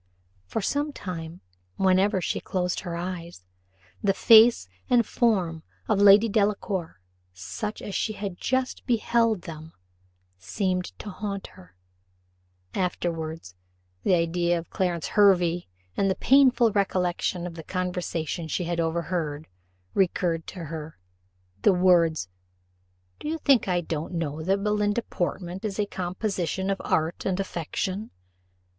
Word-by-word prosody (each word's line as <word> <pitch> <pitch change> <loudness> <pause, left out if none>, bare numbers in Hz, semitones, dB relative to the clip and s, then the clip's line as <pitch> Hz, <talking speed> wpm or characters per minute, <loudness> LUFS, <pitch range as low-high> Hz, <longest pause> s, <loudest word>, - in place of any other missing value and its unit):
For 220 - -2
some 290 +8 -1
time, 170 - -7 0.3
whenever 190 0 +3
she - - -1
closed 180 -1 -2
her 175 -2 -5
eyes, 170 - -6 0.6
the 195 -1 +2
face 230 - +7 0.2
and 240 -2 +4
form 185 -11 +1 0.3
of 200 - +2
Lady 205 +2 +8
Delacour, 200 - -1 0.4
such 210 - -5
as 200 - -6
she 215 - -1
had 200 -4 -6
just 260 0 -1
beheld 230 -4 +2
them, 160 0 -9 0.7
seemed 180 - -1
to 205 - -7
haunt 200 0 -5
her; 90 0 -17 1.0
afterwards, 165 - -3 0.5
the 185 - +3
idea 170 +1 +1
of 165 - -8
Clarence 175 -4 -1
Hervey, 180 -4 +3 0.3
and 195 - +2
the 190 - +1
painful 255 -3 +5
recollection 180 -3 0
of 175 - -5
the 165 - -8
conversation 180 -2 -3
she 170 +4 -2
had 170 0 -2
overheard, 165 -2 -2 0.5
recurred 175 -3 +1
to 180 -3 -7
her: 160 0 -7 0.6
the - - +5
words, 170 - +3 0.9
"Do - - -6
you 320 +2 -1
think 275 -8 +3
I 180 -1 +1
don't 160 +1 -4
know 160 -2 -3
that 195 +4 0
Belinda 210 +2 +1
Portman 175 -1 -3
is 210 -3 -4
a 210 - +1
composition 190 0 -2
of 195 - -2
art 160 +2 0
and 190 0 -1
affectation?" 190 +3 -3
185 Hz, 130 wpm, -26 LUFS, 170-205 Hz, 1.0 s, Lady